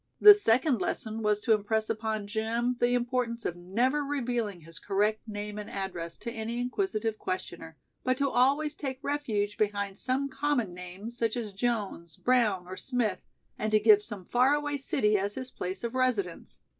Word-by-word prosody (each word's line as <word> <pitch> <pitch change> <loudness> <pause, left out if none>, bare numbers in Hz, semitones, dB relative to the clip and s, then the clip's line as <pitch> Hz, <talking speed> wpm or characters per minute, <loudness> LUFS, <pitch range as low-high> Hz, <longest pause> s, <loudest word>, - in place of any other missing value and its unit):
The 420 - +12
second 255 - +2
lesson 220 0 -2
was 210 -1 +2
to 225 - +4
impress 215 +1 0
upon 220 -1 -2
Jim 230 +4 -1
the 245 0 +3
importance 240 -1 -1
of 175 - -1
never 235 +12 0
revealing 240 -9 -2
his 165 +1 -11
correct 210 +3 0
name 210 0 -5
and 210 - -7
address 175 -4 -5
to 235 - -4
any 230 +1 -4
inquisitive 245 - -1
questioner, 175 -3 -5 0.3
but 255 0 +1
to 280 - +2
always 280 +4 +2
take 270 -3 -4
refuge 220 -9 -1
behind 200 -2 -1
some 265 +2 0
common 275 -7 -1
name 180 +5 -8
such 235 -1 -1
as 215 -4 -4
Jones, 195 - -2
Brown 225 -8 +2
or 185 +1 -8
Smith, 235 -7 -1 0.4
and 215 - 0
to 215 - +5
give 210 -1 +6
some 210 -4 -8
faraway 290 +6 +2
city 210 -6 +1
as 200 +1 -2
his 255 0 -6
place 185 +4 -5
of 235 - -3
residence. 245 -9 -1
220 Hz, 170 wpm, -29 LUFS, 205-250 Hz, 0.4 s, The